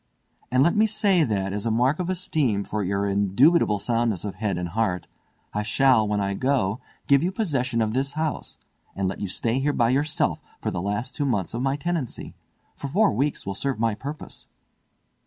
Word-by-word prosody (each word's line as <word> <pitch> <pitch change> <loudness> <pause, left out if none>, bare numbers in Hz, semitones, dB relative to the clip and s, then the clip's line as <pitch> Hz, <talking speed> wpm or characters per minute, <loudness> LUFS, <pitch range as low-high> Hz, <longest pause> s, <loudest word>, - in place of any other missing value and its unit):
And 130 +1 +4
let 170 - +3
me 215 +1 +4
say, 200 -5 +3
that, 100 -6 -1
as 105 +3 -2
a - - +2
mark 125 +7 +2
of 180 0 -2
esteem 150 - 0
for 105 +1 -3
your 100 +2 0
indubitable 105 - +3
soundness 115 -2 0
of 100 - -3
head 100 -2 -2
and 90 -1 -3
heart, 95 -2 -1 0.5
I 105 - 0
shall, 110 0 +3
when 105 0 0
I 100 0 0
go, 120 -3 0 0.3
give 140 -1 +4
you 180 - 0
possession 130 - 0
of 110 0 -2
this 135 +2 0
house, 155 -1 -3 0.4
and 95 -1 0
let 95 - -4
you 100 - -2
stay 115 +6 -1
here 145 +2 +1
by 115 -2 +2
yourself 145 +3 +1 0.2
for - - -2
the 85 - -3
last 105 +6 -2
two 145 - -1
months 100 -9 -1
of 120 - -2
my 135 +1 +1
tenancy, 155 -3 -3 0.4
for 140 - -6
four 200 +10 +3
weeks 140 +7 -1
will 100 - -3
serve 135 +3 -2
my 115 -1 +2
purpose." 140 +8 -8
120 Hz, 200 wpm, -25 LUFS, 100-145 Hz, 0.5 s, And